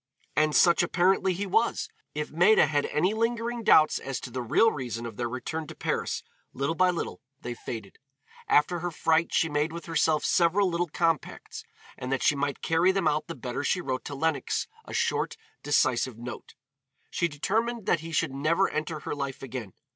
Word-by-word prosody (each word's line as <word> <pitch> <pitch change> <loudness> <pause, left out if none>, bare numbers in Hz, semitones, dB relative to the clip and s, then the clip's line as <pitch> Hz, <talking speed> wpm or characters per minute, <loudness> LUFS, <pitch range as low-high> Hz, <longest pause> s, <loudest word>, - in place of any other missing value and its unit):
And 155 0 +2
such 170 -1 +5
apparently 185 +2 +2
he 190 +3 -2
was. 225 - +1 0.3
If 150 0 -3
Maida 180 +6 +5
had 145 0 0
any 180 +7 +1
lingering 230 +1 -1
doubts 155 -7 +5
as 135 -2 -4
to 125 - -7
the 130 - -3
real 155 - +4
reason 120 -4 -5
of 115 -3 -7
their 120 +1 -2
return 155 +6 -4
to - - -9
Paris, - - -2 0.3
little 140 +5 -1
by 185 +2 +3
little 175 - -3 0.2
they 120 - -4
faded. 110 -4 -8 0.5
After 175 +4 +3
her 175 +2 -2
fright 165 0 +1
she 165 - +2
made 150 +1 0
with 170 +1 -7
herself 160 -2 +1
several 180 +3 +3
little 175 0 0
compacts, 165 0 -2 0.4
and 125 +1 -4
that 135 - 0
she - - +5
might 140 0 -2
carry 165 +3 +3
them 190 -4 0
out 150 0 0
the 165 - -6
better 125 +1 -4
she 180 - +1
wrote 130 -6 -3
to 140 - -5
Lenox 160 +3 0 0.2
a - - -9
short, 470 - 0 0.2
decisive 130 -4 +1
note. 120 0 -8 0.6
She 170 - +1
determined 220 +9 -1
that 170 - +2
he 165 +1 -8
should 160 -1 0
never 160 +7 +2
enter 155 0 -3
her - - -4
life 140 -2 -5
again. 125 -6 -6
160 Hz, 190 wpm, -27 LUFS, 135-175 Hz, 0.6 s, such